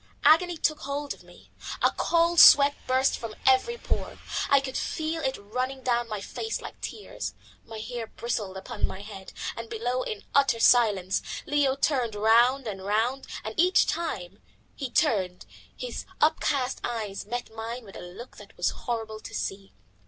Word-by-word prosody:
Agony 345 +2 +5
took 310 -1 +1
hold 280 +1 -3
of - - -17
me; - - -18 0.3
a - - +5
cold 340 0 +2
sweat 285 0 +9
burst 260 +1 +2
from 225 -2 -6
every 265 - +4
pore. - - -3 0.3
I 280 - +6
could 265 -1 -6
feel 320 +1 -2
it 265 -2 -1
running 255 +6 -4
down 240 -1 +1
my 210 -2 -4
face 445 - -4
like - - -10
tears; 425 - -6 0.3
my 225 -1 -8
hair 230 +1 -5
bristled 215 -5 -4
upon 190 - -3
my 190 - -7
head. 200 -2 -9 0.2
And 230 0 -7
below, 245 +3 -1
in 215 -4 -5
utter 275 -4 +4
silence, 205 -7 +4 0.2
Leo 285 -2 +2
turned 255 -6 0
round 235 +5 +4
and 195 -4 -5
round, 225 +7 0 0.2
and 220 - -5
each 365 +2 +5
time 340 +9 -3 0.3
he 270 -3 -4
turned 195 - +1 0.3
his - - -5
up 315 +1 +3
cast 265 -3 0
eyes 215 -5 -4
met 240 0 -4
mine 230 +2 -5
with 195 - -13
a - - -7
look 180 +8 -10
that - - -14
was - - +1
horrible 225 -3 -4
to - - -9
see. 195 0 -4
245 Hz, 170 wpm, -27 LUFS, 215-280 Hz, 0.3 s, sweat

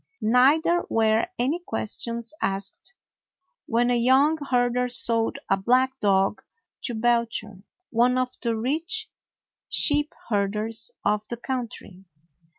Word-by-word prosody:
Neither 285 +9 +4
were 220 +2 +2
any 275 +8 0
questions 235 -3 -4
asked 195 - -3 0.7
when 240 +1 +1
a - - +3
young 265 +6 +4
herder 245 0 +1
sold 230 0 +2
a 195 - +2
black 255 +6 +1
dog 195 0 +1 0.4
to 240 - -2
Belcher, 230 -3 -1 0.3
one 245 +2 +3
of 255 0 0
the 230 -2 -1
rich 330 - -2 0.6
sheep 295 0 +3
herders 210 - -1 0.2
of 210 0 0
the 235 - -5
country. 235 -7 -6
235 Hz, 115 wpm, -25 LUFS, 220-260 Hz, 0.7 s, Neither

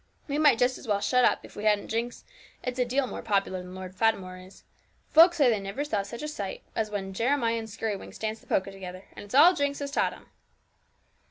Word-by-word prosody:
We 290 0 -1
might 295 -6 +5
just 250 +2 +1
as - - -12
well 205 -2 +1
shut 250 +4 +2
up, - - +2
if - - -15
we 205 - -6
hadn't 210 -1 +2
Jinx; 235 +2 -3 0.4
it's 250 0 -4
a 250 - +3
deal 260 +3 +1
more - - -6
popular 195 -4 0
than 180 0 -10
Lord 185 0 -8
Fatimore 190 -4 0
is 185 +1 -15 0.5
folks 340 +2 +7
say 285 -4 +5
they 225 -4 +3
never 195 +8 -4
saw 215 -9 0
such 235 +7 -8
a - - -2
sight 205 -11 -5
as 220 -1 -1
when 195 -2 -4
Jeremiah 230 +1 +1
and 220 - -7
Skirrywinks 210 -1 -5
dance 220 0 -3
the - - -23
polka 195 +1 0
together; 185 -1 -9
and - - -8
it's 205 +4 -7
all 330 +6 +8
Jinx 285 -3 -1
that - - -5
has 280 - -4
taught - - +2
them.' - - -15
225 Hz, 240 wpm, -27 LUFS, 195-260 Hz, 0.5 s, all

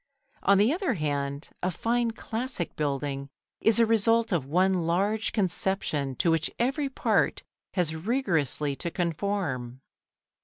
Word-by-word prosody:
On 200 - +4
the 215 +8 +4
other 350 - 0
hand, 145 -2 -2
a 180 - +1
fine 235 +6 0
classic 225 -3 -4
building 140 -1 -2 0.3
is 225 0 +3
the 230 - +6
result 225 +1 +3
of 160 -8 0
one 185 +6 +3
large 205 +6 +1
conception 180 -8 0
to 165 - +2
which 165 -1 +1
every 275 +4 0
part 270 - +1 0.3
has 170 -4 +1
rigorously 160 - 0
to 170 - -2
conform. 165 -8 -2
180 Hz, 130 wpm, -27 LUFS, 150-225 Hz, 0.3 s, the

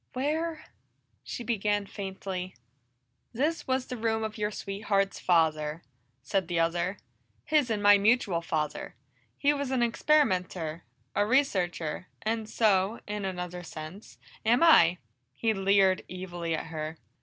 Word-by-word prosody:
"Where 310 +4 -2 0.3
" - - -44
she 240 - -4
began 210 -3 0
faintly. 190 -2 -5 0.8
"This 300 +7 -1
was 260 0 0
the 250 - -6
room 220 0 0
of 215 0 -4
your 210 -1 -1
sweetheart's 195 -1 -1
father," 160 -2 +1 0.4
said 185 +6 0
the 170 -1 0
other. 175 +4 0 0.5
"His 300 -5 +2
and 210 -2 -1
my 205 0 +7
mutual 205 -5 +3
father. 155 -3 -3 0.4
He 290 +1 +3
was 285 -2 -3
an 260 -2 +1
experimenter, 185 - +1 0.3
a 205 - +2
researcher, 185 - 0 0.2
and 220 0 -1
so, 210 -1 +2
in 205 -1 -3
another 180 -1 -4
sense, 165 +4 -9 0.3
am 235 +6 +4
I!" 180 - +7 0.4
He 225 +8 +1
leered 195 -1 +3
evilly 175 -2 -4
at - - -4
her. 155 +1 -4
200 Hz, 135 wpm, -29 LUFS, 175-230 Hz, 0.8 s, my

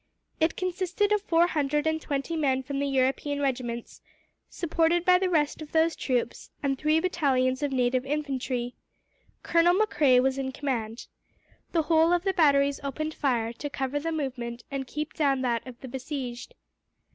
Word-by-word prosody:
It 320 +1 +2
consisted 370 +3 -1
of 420 -1 +3
four 340 -3 +3
hundred 295 -2 0
and 315 0 0
twenty 285 +3 -3
men 265 -4 +1
from 275 +1 -4
the 280 - 0
European 270 +2 0
regiments, 245 -4 -3 0.5
supported 335 +1 +1
by 360 0 +6
the 375 -1 0
rest 310 -3 +1
of 305 - -9
those 320 0 +3
troops, 245 -3 -2
and 275 -1 +1
three 305 +3 +2
battalions 265 -7 +1
of 290 -1 -1
native 255 -1 +1
infantry. 265 -4 -2 0.7
Colonel 340 +1 +4
Macrae 295 -11 +4
was 265 +1 +1
in 265 -1 -3
command. 235 -5 -3 0.7
The 330 -2 +2
whole 325 +1 +4
of 350 0 +1
the 385 -1 +1
batteries 280 -4 +3
opened 310 +3 -3
fire, 235 -6 0
to 290 +5 -6
cover 270 +1 -2
the 330 +3 -3
movement 250 -6 -4
and 270 -1 -3
keep 300 +3 -4
down 275 -4 +1
that 240 -1 -1
of 250 -1 -10
the 265 - -7
besieged. 260 - -6
280 Hz, 170 wpm, -27 LUFS, 260-320 Hz, 0.7 s, by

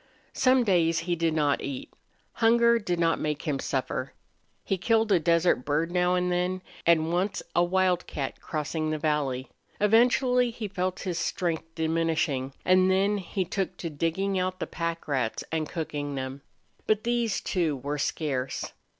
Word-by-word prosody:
Some 255 -1 +4
days 170 -6 +3
he 175 +1 -1
did 165 -1 0
not 145 -2 +2
eat. 135 -2 -6 0.4
Hunger 235 0 +4
did 180 -5 -2
not 165 -1 +2
make 150 -2 -2
him 145 -3 -1
suffer. - - -2 0.5
He 195 - -1
killed 225 +2 +2
a 185 - +5
desert 170 -4 +2
bird 155 +5 0
now 180 0 +2
and 180 0 0
then, 180 +1 -1 0.2
and 165 0 +4
once 190 +3 0
a 175 - +5
wildcat 180 -6 0
crossing 155 +1 -2
the 155 - -1
valley. 145 -4 -1 0.3
Eventually 245 +3 +4
he 230 -2 -5
felt 185 -1 -2
his 175 -3 -2
strength 165 -2 -2
diminishing, 160 -4 0
and 185 0 +5
then 200 +2 +2
he 190 0 -3
took 185 0 -3
to 165 - -5
digging 185 +6 -1
out 185 0 -2
the - - -2
pack 170 0 -4
rats 130 -6 -1
and 160 -2 -1
cooking 145 -3 -4
them. 135 +1 -5 0.5
But 215 -1 +2
these, 235 -2 0
too, 165 -5 0
were 145 +3 -4
scarce. 140 -3 -2
170 Hz, 160 wpm, -27 LUFS, 155-190 Hz, 0.5 s, a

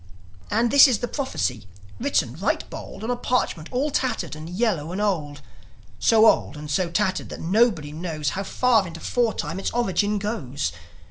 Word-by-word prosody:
And 225 +3 +1
this 280 +1 +9
is 250 -4 +2
the 245 - -3
prophecy, 185 - -2 0.3
written 280 +3 0
right - - -1
bold - - -8
On 230 - -1
a - - +1
parchment 240 -10 -1
all 275 +4 0
tattered 255 - -1
and 155 +2 -8
yellow 180 -5 -1
and 185 - -3
old; 160 -9 -1 0.6
So 225 -1 +5
old 160 - +3
and 150 0 -7
so 175 +4 +1
tattered 190 +2 -1
that - - -7
nobody 185 -5 +2
knows 155 -2 -3
How 190 - -3
far 225 0 +2
into 165 0 -8
foretime 195 -9 -1
its - - -1
origin 210 -3 0
goes. 150 - -3
195 Hz, 175 wpm, -24 LUFS, 160-235 Hz, 0.6 s, this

